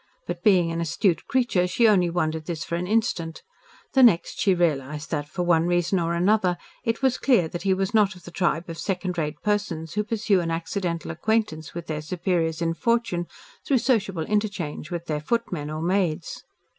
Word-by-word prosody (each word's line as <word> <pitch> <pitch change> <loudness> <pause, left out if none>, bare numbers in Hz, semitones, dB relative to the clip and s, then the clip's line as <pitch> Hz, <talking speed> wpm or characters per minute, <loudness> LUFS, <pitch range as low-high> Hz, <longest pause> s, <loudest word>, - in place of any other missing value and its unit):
But, - - -5
being 180 -6 +4
an 165 0 -2
astute 170 +2 0
creature, 240 -9 +2
she 230 +5 +3
only 185 -5 +4
wondered 160 -2 -1
this 160 -3 -3
for - - -7
an 175 +1 -1
instant, 190 -7 -1 0.5
the 265 - +5
next 220 -9 +4
she 195 -2 +3
realised 150 -3 -1
that, 145 -2 -2
for 180 +3 -2
one 170 -1 +3
reason 175 +1 +1
or 170 0 0
another, 180 0 +2 0.3
it 230 +3 -1
was 260 -1 +2
clear 235 -12 +3
that 175 - -5
he 190 -1 +2
was 195 +2 -2
not 210 -2 +3
of 180 - -15
the 175 - -10
tribe 170 -2 0
of 165 -1 -7
second 180 -2 -2
rate 150 -1 -3
persons 185 -6 -1
who 210 - 0
pursue 215 -3 +1
an 170 -1 -2
accidental 170 +1 -2
acquaintance 170 -4 -1
with 170 -1 -5
their 155 -1 -3
superiors 165 0 -1
in 165 0 +1
fortune, 230 -5 0 0.4
through 275 - +2
sociable 200 -9 0
interchange 205 -8 -2
with 170 -2 -4
their 150 -3 -2
footmen 175 -6 -2
or 155 +1 -4
maids. 175 -2 -1
175 Hz, 195 wpm, -25 LUFS, 165-205 Hz, 0.5 s, the